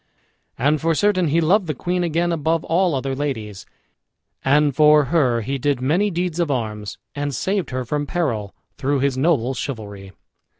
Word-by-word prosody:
And 145 +4 +1
for 165 0 +1
certain 185 -2 +2
he 155 +3 +2
loved 180 +4 +2
the 155 - -2
queen 180 +6 -1
again 170 +1 0
above 165 0 0
all 175 -1 +1
other 135 0 -2
ladies; 115 -8 -4 0.8
and 145 0 +3
for 150 -1 +6
her 125 -8 +3
he 135 +5 -3
did 140 0 0
many 165 +11 +1
deeds 175 -2 -2
of 170 -3 +1
arms, 110 -6 -3 0.2
and 145 -2 -3
saved 190 - -1
her 130 0 -3
from 145 +3 -2
peril, 115 - -2 0.2
through 140 0 0
his 140 -1 +1
noble 135 -3 +1
chivalry. 105 -7 -6
145 Hz, 170 wpm, -21 LUFS, 130-165 Hz, 0.8 s, for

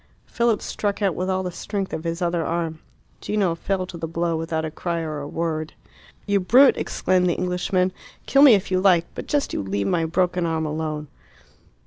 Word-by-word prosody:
Philip 235 -3 0
struck 205 0 -2
out 195 -3 +2
with 185 +3 -3
all 190 0 0
the 180 - -3
strength 195 +2 -4
of 160 - -4
his 170 +2 -2
other 170 -1 0
arm. 165 -1 -2 0.4
Gino 200 -5 0
fell 185 +2 -2
to 180 -1 -9
the 165 0 -4
blow 170 +1 -1
without 160 0 -2
a 155 - -4
cry 170 +1 -3
or 155 -2 -4
a 145 - -6
word. 155 0 -3 0.5
"You 200 -1 +2
brute!" 255 +9 +6
exclaimed 180 0 +1
the 175 - +1
Englishman. 180 +1 0 0.3
"Kill 275 - +4
me 275 -6 +9
if 195 -1 -3
you 185 - +3
like! 180 -4 +4
But - - -7
just 290 -1 0
you - - -1
leave 100 +1 -2
my 165 - +1
broken 180 +1 0
arm 160 -1 -1
alone." 155 0 -3
175 Hz, 200 wpm, -23 LUFS, 160-190 Hz, 0.5 s, me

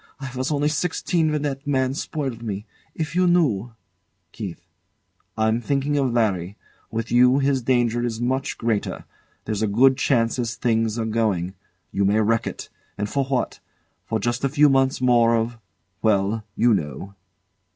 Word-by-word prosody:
I 135 -2 -6
was 130 +4 -2
only 145 0 +1
sixteen 160 +1 0
when 150 -1 -1
that 140 -1 -3
man 130 -2 +1
spoiled 135 -5 -4
me. 105 -2 -4 0.3
If 160 0 -4
you 180 0 +3
knew 125 - +2 0.6
KEITH. - - -7 0.7
I'm 110 +1 +1
thinking 140 +3 0
of 135 -3 +1
Larry. 100 -5 0 0.3
With 115 0 -4
you, 125 +2 +5
his 140 -1 +1
danger 120 -1 +1
is 115 -2 -2
much 130 +3 -1
greater. 115 -3 -2 0.4
There's 105 -1 -2
a 110 - +2
good 130 +6 +4
chance 115 -2 +1
as 115 -1 -2
things 115 -2 0
are 115 - -1
going. 105 -5 0 0.4
You 100 - 0
may 100 +2 +3
wreck 115 +1 +1
it. - - -6 0.3
And 105 - -2
for 135 +5 -1
what? 130 -2 -2 0.6
Just 120 +4 -2
a 135 - +2
few 150 +1 +5
months 135 -1 +2
more 120 -2 +4
of 115 +1 -2 0.4
well 105 0 +1
you 120 -1 +4
know. 75 +2 -3
120 Hz, 160 wpm, -23 LUFS, 110-135 Hz, 0.7 s, you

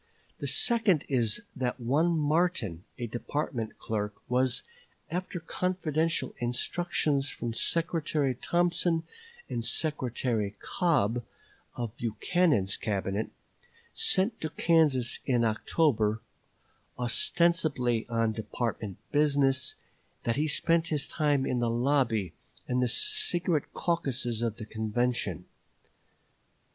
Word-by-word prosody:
The - - -3
second 225 - +3
is 120 -6 +2
that 125 0 -2
one 155 +8 +2
Martin, 150 - 0
a 120 - -3
department 120 0 -3
clerk, 105 -2 -3
was, 125 0 +2 0.5
after 180 +1 -3
confidential 165 -2 -1
instructions 140 +3 0
from 120 -3 -4
Secretary 155 -2 0
Thompson 170 +3 +1 0.4
and 115 - -3
Secretary 120 -8 -1
Cobb, 125 - +1 0.5
of 120 -2 -4
Buchanan's 120 - +1
Cabinet, 100 0 -2 0.6
sent 205 +5 +1
to 155 - -2
Kansas 150 -7 +3
in 120 -3 +3
October, 110 -1 +1 0.8
ostensibly 125 -2 +2
on 115 -1 +1
department 110 -2 -3
business; 140 -3 +3 0.5
that 115 - 0
he 150 +2 +1
spent 165 +2 +2
his 150 -4 0
time 145 -4 +1
in 125 - 0
the 120 -1 +1
lobby 115 - +1 0.3
and 125 0 +1
the 125 - +3
secret 180 - +1
caucuses 130 -9 -1
of 115 -2 -1
the 110 - -7
convention. 110 -4 -1
130 Hz, 105 wpm, -29 LUFS, 115-160 Hz, 0.8 s, second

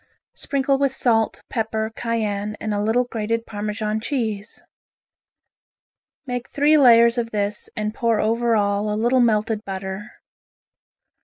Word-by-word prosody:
Sprinkle 275 -1 0
with 275 -1 +1
salt, 225 -4 +1
pepper, 220 -2 -2
cayenne, 215 -2 -2
and 215 -1 -3
a 205 - -1
little 225 +4 +2
grated 230 -1 -3
Parmesan 210 0 -3
cheese. 220 -4 -3 1.6
Make 245 -2 -4
three 295 +2 +3
layers 235 -4 +6
of 230 -1 -2
this 210 -1 -2
and 215 0 -2
pour 230 -2 +1
over 230 +1 +1
all 205 0 +1
a 210 - -1
little 240 +4 +2
melted 215 -2 +1
butter. 190 +2 -6
220 Hz, 130 wpm, -22 LUFS, 210-240 Hz, 1.6 s, layers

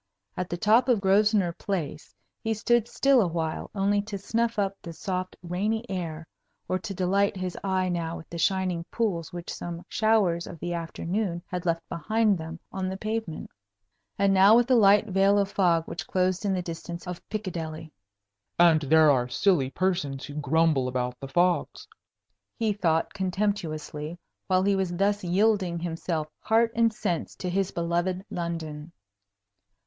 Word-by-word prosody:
At 180 -1 -3
the 175 - -3
top 225 +6 +4
of 240 -4 +4
Grosvenor 195 -2 +3
Place 165 -6 -4 0.2
he 225 0 -1
stood 235 +1 +2
still 275 -1 +3
awhile 165 -4 -2
only 200 +1 +2
to 205 0 -6
snuff 230 +3 -1
up 200 -1 0
the 170 - -8
soft, 185 +1 -4
rainy 210 +7 -1
air, 165 -4 -4 0.4
or 185 - 0
to 195 -1 -6
delight 195 +2 +1
his 185 -1 -4
eye 190 -1 +1
now 170 -2 -2
with 160 - -11
the 170 - -7
shining 185 -1 +1
pools 190 -8 -2
which 175 -1 -6
some 170 0 -6
showers 210 -6 +2
of 170 - -8
the 175 +3 -4
afternoon 170 +2 -3
had 180 0 -5
left 165 0 -1
behind 215 +4 +1
them 165 0 -7
on 190 -1 -3
the 190 - -4
pavement, 215 -5 -4 0.7
and 195 0 +3
now 195 +3 +7
with 240 +1 +5
the 255 +1 +3
light 205 -2 +6
veil 195 0 +3
of 200 -1 +1
fog 170 -4 +3
which 170 - -6
closed 185 +2 0
in 200 - +1
the 180 -1 -1
distance 170 +1 -7
of 180 -1 -6
Piccadilly. 165 -6 -5 0.7
"And 170 -2 +6
there 155 +1 +5
are 125 -2 +1
silly 160 -5 +2
persons 145 -5 -1
who 145 - -9
grumble 150 -2 +2
about 125 -1 -2
the 135 - -6
fogs!" 175 +5 0 0.7
he 220 -3 +1
thought, 165 -5 0
contemptuously, 175 -5 -2 0.3
while 185 -1 +3
he 200 0 +3
was 190 -2 -1
thus 200 +2 +1
yielding 185 -1 +2
himself 165 -2 -3
heart 225 +1 +2
and 230 0 +4
sense 175 -5 -3
to 185 - -5
his 195 +1 0
beloved 175 +3 -1
London. 165 -2 -5
180 Hz, 165 wpm, -27 LUFS, 165-200 Hz, 0.7 s, now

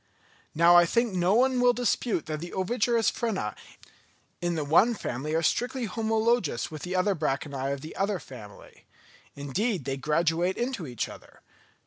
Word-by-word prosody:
Now 170 +2 +6
I 175 0 +7
think 235 +2 +1
no 180 +2 +2
one 255 +1 +3
will 245 0 +5
dispute 240 -5 -1
that 155 -1 -4
the 175 +2 -8
ovigerous 230 +3 +1
frena 190 - -3 0.9
in 175 -1 -1
the 155 -2 -2
one 195 +11 +4
family 150 - -4
are 165 - +1
strictly 245 +7 0
homologous 220 - 0
with 155 -2 -7
the 180 - -5
branchiæ 145 -7 -1
of 140 -1 -4
the 155 - -9
other 200 0 0
family; 110 - -13 0.5
indeed, 150 - -2
they 135 0 -2
graduate 165 +5 0
into 240 - -3
each 120 -3 -3
other. - - -14
175 Hz, 155 wpm, -27 LUFS, 150-225 Hz, 0.9 s, I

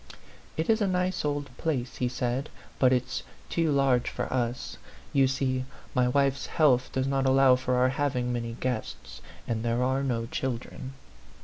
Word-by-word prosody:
" - - -24
It 160 - 0
is 225 0 +3
a 205 - +3
nice 185 0 0
old 145 -3 -2
place," 130 -6 -2
he 125 - 0
said, 125 +3 -2
" - - -24
but 130 -1 +5
it's 125 0 0 0.3
too 165 -2 +1
large 135 -3 +3
for - - -4
us. 120 -1 -2 0.3
You 135 -1 +5
see, 130 -1 0 0.3
my 125 -2 +3
wife's 140 +1 +1
health 130 -6 +3
does 130 0 0
not 135 0 +1
allow 135 0 +6
of 125 0 +1
our 125 0 +4
having 125 -2 0
many 115 -1 -3
guests; 125 -4 -4 0.3
and 115 -2 -1
there 120 +1 +1
are 130 +1 +1
no 120 -4 -1
children." 130 +1 -4
130 Hz, 180 wpm, -28 LUFS, 125-140 Hz, 0.3 s, allow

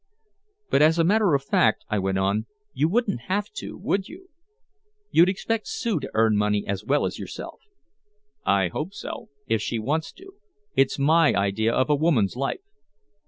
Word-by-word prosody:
"But - - +4
as 160 +2 +5
a 165 - +4
matter 200 -2 +3
of 135 - -1
fact," 110 -5 +2
I 105 - -1
went 95 0 -1
on, 100 +3 0 0.3
"you 150 +4 +1
wouldn't 210 - 0
have 205 +2 -1
to, - - -6
would 195 -1 -1
you? 370 +2 -13 0.8
You'd 175 +3 +5
expect 215 +3 -2
Sue 225 -9 -1
to - - -6
earn 110 -1 +3
money 105 0 +1
as 100 0 -3
well 140 +6 +1
as - - -4
yourself." - - -8 0.8
"I 95 -2 +2
hope 160 - -5
so - - -7 0.2
if 115 -4 0
she 115 - -2
wants 150 +9 -2
to 385 +2 -15 0.4
it's 135 - +2
my 155 +3 +4
idea 100 +3 +1
of 130 - +1
a - - +5
woman's 140 - +1
life." 140 - -3
140 Hz, 175 wpm, -24 LUFS, -, 0.8 s, as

